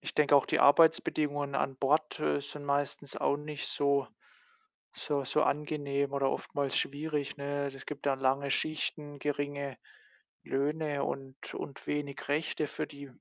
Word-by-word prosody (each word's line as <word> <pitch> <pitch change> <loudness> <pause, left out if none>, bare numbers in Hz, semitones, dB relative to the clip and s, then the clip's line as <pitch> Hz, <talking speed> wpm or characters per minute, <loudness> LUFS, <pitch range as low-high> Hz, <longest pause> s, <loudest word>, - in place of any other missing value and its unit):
ich - - -6
denke 145 -1 +5
auch 140 - +6
die - - +2
Arbeitsbedingungen 145 -2 +4
an 135 -1 0
Bord, 150 +3 +2
äh, 75 -1 +1
sind 145 - -8
meistens 140 0 -1
auch 140 - +2
nicht 150 0 -5
so 140 -1 +2 0.9
so 140 -2 -1
so 150 +4 +2
angenehm 140 -1 0
oder 135 -1 +2
oftmals 140 0 -2
schwierig, 145 0 -1
ne? 140 0 -2
Es 135 -1 -7
gibt 145 -1 -6
dann 135 -1 +2
lange 135 +1 +2
Schichten, 150 -1 -1
geringe 145 -2 -2 0.7
Löhne 145 +1 0
und 135 -1 -6
und 140 - -7
wenig 145 -2 -3
Rechte 155 +1 0
für - - -4
die 140 0 -10
145 Hz, 150 wpm, -31 LUFS, 140-150 Hz, 0.9 s, auch